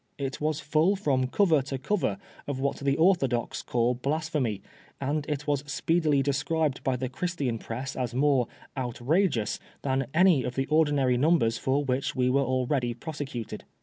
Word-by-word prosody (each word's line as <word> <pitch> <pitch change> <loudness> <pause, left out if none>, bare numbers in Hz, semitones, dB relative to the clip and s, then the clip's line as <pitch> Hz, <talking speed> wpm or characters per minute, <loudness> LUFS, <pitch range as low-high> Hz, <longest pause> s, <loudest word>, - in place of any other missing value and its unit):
It 135 0 -4
was 155 0 0
full 155 +6 +2
from 135 -9 +1
cover 160 0 +3
to 135 0 -4
cover 190 +10 -1 0.3
of 140 -2 -3
what 140 +1 -1
the 140 0 0
orthodox 150 -9 +2
call 120 0 +1
blasphemy, 140 - -2 0.4
and 145 +2 -2
it 150 -1 -2
was 145 -2 0
speedily 155 -2 +2
described 145 +1 0
by 130 -2 +1
the 130 +1 -2
Chrisiian 135 -4 -2
press 130 +5 -5
as 125 -2 -3
more 135 -3 +3
" - - -23
outrageous 125 - 0
" - - -31
than 135 -1 0
any 170 -4 +4
of 125 - -4
the 135 - 0
ordinary 145 -5 +3
numbers 125 -6 +2
for 135 +2 +1
which 130 0 -1
we 125 0 +2
were 140 +2 +3
already 130 -1 0
prosecuted. 135 -4 -6
140 Hz, 170 wpm, -27 LUFS, 125-155 Hz, 0.4 s, any